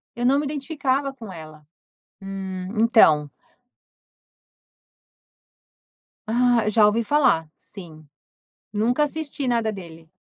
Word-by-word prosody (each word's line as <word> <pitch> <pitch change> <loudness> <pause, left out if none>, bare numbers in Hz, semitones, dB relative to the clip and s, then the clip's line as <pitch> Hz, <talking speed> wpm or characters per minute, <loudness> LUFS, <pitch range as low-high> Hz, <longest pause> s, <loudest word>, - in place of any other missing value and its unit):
Eu 240 +1 -2
não 275 +3 +4
me 295 - -2
identificava 275 -2 -2
com 225 -7 -10
ela. 155 -2 -12 0.6
Hum. 190 -1 -6
Então. 160 - +4 3.0
Ah, 240 0 +2
já 215 0 +4
ouvi 225 +3 +1
falar. 240 - +2
Sim. 160 -6 -11 0.7
Nunca 240 +7 +1
assisti 295 -2 -3
nada 230 -3 +1
dele. 165 -5 -11
225 Hz, 100 wpm, -23 LUFS, 185-265 Hz, 3.0 s, não